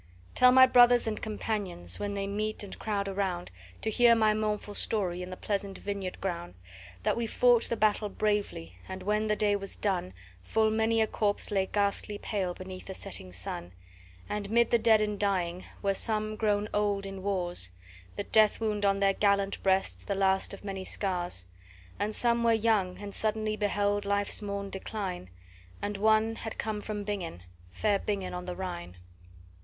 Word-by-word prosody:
"Tell 250 0 +6
my 260 0 +9
brothers 245 -1 +6
and 220 -1 -2
companions, 205 - -2
when 205 0 -3
they 200 0 -2
meet 215 +2 -2
and 200 - -9
crowd 200 -2 -1
around, 190 -3 -2 0.3
To 220 - 0
hear 235 +1 +6
my 215 -1 +4
mournful 210 -1 -2
story, 185 -5 0
in 180 - -6
the 185 - -7
pleasant 200 -1 -3
vineyard 200 -2 -4
ground, 170 - -4 0.5
That - - +2
we 235 -1 -1
fought 240 +1 +4
the 235 - -1
battle 210 0 +2
bravely, 200 - -2
and 190 0 -6
when 210 +2 +1
the 210 - +2
day 210 -1 +2
was 195 -1 -5
done, 185 - -1 0.3
Full 220 - +1
many 225 +1 +2
a - - +4
corpse 210 -1 -1
lay 195 -2 +1
ghastly 205 +1 0
pale 190 -4 -2
beneath 185 0 -9
the 190 - -5
setting 95 - -3
sun; 90 0 -5 0.5
And, 210 -1 -3
mid 235 +1 +3
the 235 - +5
dead 220 -1 +5
and 210 -1 -1
dying, 185 -3 0 0.2
were 200 0 +2
some 215 +1 0
grown 210 -1 +1
old 205 -1 +1
in 195 -1 -6
wars, 180 - 0 0.5
The 205 - -3
death 215 0 +4
wound 210 -2 -1
on 195 0 +2
their 195 0 +4
gallant 200 -1 +1
breasts, 190 0 +1
the 200 - -2
last 190 0 +2
of 200 - -8
many 195 -2 -4
scars; 180 - -2 0.5
And 210 +1 -1
some 235 -1 +3
were 230 -1 +4
young, 215 -5 +2
and 200 -1 -7
suddenly 215 0 0
beheld 205 -1 0
life's 200 +1 0
morn 200 -1 -4
decline, 190 - -4 0.5
And 205 0 -3
one 220 +2 +3
had 225 - -6
come 215 -2 -2
from 210 -1 -4
Bingen, 185 - -4 0.3
fair 200 - +1
Bingen 200 -3 -3
on 180 0 -5
the 180 -1 -4
Rhine. 175 - -6
205 Hz, 180 wpm, -29 LUFS, 190-215 Hz, 0.5 s, my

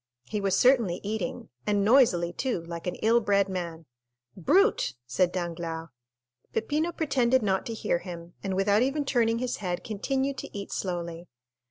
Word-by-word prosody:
He 210 +7 -3
was 195 -1 +2
certainly 235 -9 +4
eating, 205 -3 -3 0.2
and 205 -1 +2
noisily 205 -8 +4
too, 245 -9 -2
like 170 +1 -7
an 180 - -1
ill 230 +2 +5
bred 200 -2 +3
man. 170 -4 -5 0.5
"Brute!" 370 - +3
said 175 +9 +1
Danglars. 165 -2 -4 0.6
Peppino 305 +9 0
pretended 260 -7 +2
not 190 -2 0
to 230 - -3
hear 175 - 0
him, 170 -1 -9
and 195 -1 -2
without 200 +2 +3
even 275 +3 +1
turning 230 -4 +2
his 250 +1 -2
head 180 -3 -3
continued 265 +5 -1
to - - -6
eat 200 - -6
slowly. 170 -2 -4
200 Hz, 160 wpm, -28 LUFS, 175-245 Hz, 0.6 s, ill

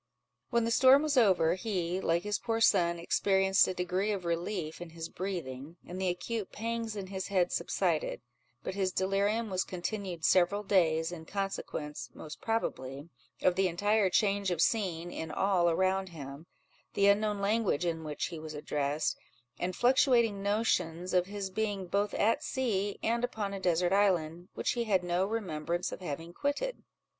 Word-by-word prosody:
When 235 -2 +2
the 230 - 0
storm 260 +4 +6
was 305 -2 0
over, 190 -9 +4
he, 185 -2 -2
like 170 0 +1
his 210 -1 -1
poor 225 -1 -1
son, 170 -6 +4
experienced 190 +3 +3
a - - -1
degree 180 +4 0
of 195 -4 -3
relief 170 -1 -2
in 175 - -7
his 165 0 -7
breathing, 165 -5 -5
and 185 +2 -6
the 190 - +1
acute 200 +4 -3
pangs 230 0 -3
in 200 -2 -4
his 190 0 -5
head 185 -3 +1
subsided; - - 0 0.4
but - - -3
his 190 -1 0
delirium 200 +4 0
was 185 0 +1
continued 185 -2 -4
several 190 +3 +3
days, 165 -5 +2
in 165 -2 -8
consequence 195 -6 -4
(most 155 0 -9
probably) 145 - -3 0.3
of 185 - +5
the 190 +1 +2
entire 205 +3 +2
change 200 0 +2
of 175 -3 -1
scene 175 -4 +1
in 160 - -5
all 185 -3 +2
around 190 +2 +1
him, 145 -1 -9 0.5
the 200 - +3
unknown 205 0 +3
language 200 -5 +1
in 165 -1 -2
which 150 -1 -3
he 165 - -7
was 155 -1 -7
addressed, 145 0 -1 0.4
and 180 +1 -2
fluctuating 240 -5 +3
notions, 185 -5 0
of 180 0 +3
his 200 -1 -5
being 205 -1 -2
both 200 +3 0
at 230 +7 +2
sea 210 -9 -1
and 235 +2 +1
upon 215 -5 -2
a 195 - -4
desert 180 0 +2
island, 175 -4 +1
which - - 0
he 235 -1 -1
had 190 -4 +2
no 175 +2 +1
remembrance 175 -5 -2
of - - -6
having 165 0 -5
quitted. 290 - -2
190 Hz, 170 wpm, -31 LUFS, 170-210 Hz, 0.5 s, storm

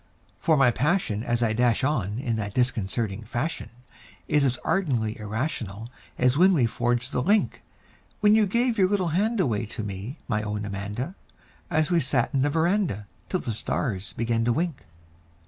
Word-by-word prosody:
For 160 -2 +3
my 130 -3 +5
passion 145 - 0
as 120 0 0
I 110 -2 +2
dash 120 +2 +2
on 115 -8 0
in 120 -3 -1
that 100 -2 -4
disconcerting 115 -4 0
fashion 120 +8 -3 0.6
Is 150 -1 +3
as 130 -2 +2
ardently 120 - 0
irrational 110 - -4 0.3
as 125 +3 +3
when 190 +1 +6
we 130 -7 +3
forged 120 +1 -1
the - - 0
link 205 +8 +2 0.6
When 210 -1 +5
you 215 -1 +4
gave 235 +2 +1
your 185 -1 +4
little 190 -4 +1
hand 210 +7 +1
away 120 - 0
to 110 0 -5
me, 105 - -6
my 110 -3 0
own 105 -1 -3
Amanda 105 - -4 0.6
An 155 -1 +2
we 170 - +4
sat 130 -2 0
'n 135 - +2
the 145 - +2
veranda 165 - +1 0.2
till 185 - -1
the 115 - -3
stars 100 -3 -3
began 115 0 0
to 120 - +3
wink. 165 +1 -2
125 Hz, 175 wpm, -26 LUFS, 110-165 Hz, 0.6 s, when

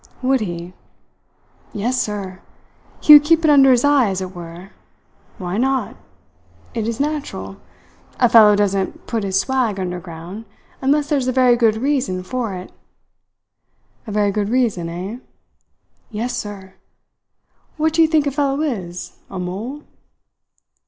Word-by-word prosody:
"Would 265 +1 +2
he?" 175 -2 -5 1.0
"Yes, 245 +5 -1
sir. 195 -3 -5 0.6
He 300 - +8
would 295 -1 +10
keep 330 +2 +3
it 305 - +5
under 275 -2 +6
his 245 -2 +4
eye, 285 -6 +4
as 190 -1 -2
it 185 0 -6
were. 175 +2 -10 0.7
Why 185 0 -3
not? 265 +1 0 0.8
It 225 -2 -2
is 230 -1 -3
natural. 295 0 -3 0.6
A 245 - +5
fellow 220 -3 +7
doesn't 195 -2 -1
put 225 -3 -2
his 195 -1 +1
swag 245 -5 0
underground, 180 +2 -6 0.4
unless 285 +2 +2
there's 280 -4 0
a - - +2
very 255 -1 +4
good 230 -2 +3
reason 250 -8 -1
for 230 -1 -3
it." 180 0 -9 1.4
"A - - -5
very 205 -1 +1
good 205 0 -1
reason, 225 -9 0
eh?" 185 +8 -6 0.9
"Yes, 235 +2 -3
sir. 195 -2 -7 1.0
What 315 0 +1
do 330 - +3
you 320 - +6
think 310 -2 +2
a 285 - 0
fellow 280 0 0
is 185 - -5
a 190 - -7
mole?" 210 +11 -5
225 Hz, 145 wpm, -20 LUFS, 190-265 Hz, 1.4 s, would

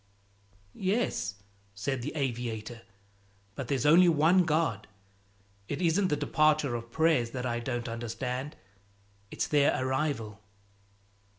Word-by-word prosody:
"Yes," 190 - -1 0.4
said 130 +6 -2
the - - -4
aviator, 120 -4 -3 0.7
"but 130 +3 -6
there's 135 -1 -1
only 175 +4 +7
one 170 +3 +4
God. 155 -9 0 0.8
It 145 - -4
isn't 180 +2 +2
the 150 - +1
departure 155 -3 +2
of 115 0 -5
prayers 160 -6 +2
that 125 -1 -3
I 120 -1 -1
don't 120 -1 -3
understand; 125 +4 -4 0.7
it's - - -2
their 145 -3 +2
arrival." 130 -5 -2
135 Hz, 115 wpm, -29 LUFS, 120-155 Hz, 0.8 s, only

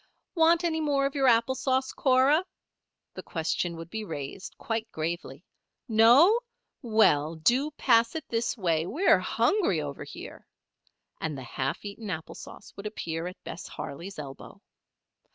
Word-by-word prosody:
"Want 335 0 +4
any 320 -2 0
more 285 -2 +1
of 275 - -1
your 275 -2 +2
apple 235 +1 +4
sauce, 260 0 0
Cora?" 270 +5 +3 0.7
the - - -7
question 170 +1 -2
would 165 +1 -9
be 220 -1 -4
raised, 160 -1 -7
quite 225 -1 -3
gravely. 160 -1 -5 0.4
"No? 245 - +6 0.4
Well 165 - +3
do 245 - +2
pass 230 0 +3
it 315 - -5
this 230 +2 -1
way, 165 -4 0
we're 355 - +3
hungry 365 - +1
over 145 -2 -5
here," - - -10 0.7
and 155 -3 -3
the 130 - -7
half 130 - -3
eaten 205 +1 -7
apple 160 -3 -5
sauce - - -12
would 200 +1 -6
appear 165 -5 -4
at 180 - -10
Bess - - -7
Harley's 175 +8 -7
elbow. 140 -3 -9
220 Hz, 150 wpm, -28 LUFS, 165-265 Hz, 0.7 s, No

